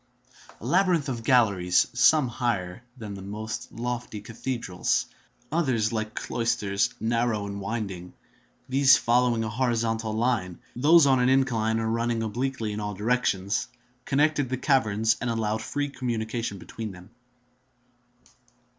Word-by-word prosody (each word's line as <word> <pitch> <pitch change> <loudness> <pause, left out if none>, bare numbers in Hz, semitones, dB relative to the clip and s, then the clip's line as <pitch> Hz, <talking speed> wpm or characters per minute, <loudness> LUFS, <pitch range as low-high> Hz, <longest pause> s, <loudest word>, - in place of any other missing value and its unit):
A - - -10
labyrinth 180 -6 +2
of 120 -3 -4
galleries, 100 -8 +3
some 130 +3 +5
higher 115 -6 -2 0.2
than 110 -4 -7
the 100 - -8
most 110 +3 -6
lofty 120 -2 -4
cathedrals, 115 -3 -2 0.5
others 125 -9 +1
like 110 -1 -3
cloisters, 100 -4 0
narrow 115 -2 0
and 100 0 -5
winding—these 115 +6 0
following 120 0 +2
a 110 - -2
horizontal 115 -2 -1
line, 110 -6 0 0.2
those 150 +5 +6
on 135 -2 +4
an 125 +1 +3
incline 115 -4 +2
or 110 - -1
running 115 0 0
obliquely 115 0 -2
in 105 - -4
all 105 -1 -4
directions—connected 125 +6 -1
the 130 - -1
caverns 110 -6 +2
and 125 - -1
allowed 110 -1 -1
free 145 +3 -2
communication 115 -5 -3
between 110 +3 -7
them. 90 +3 -14
115 Hz, 125 wpm, -26 LUFS, 105-125 Hz, 0.5 s, those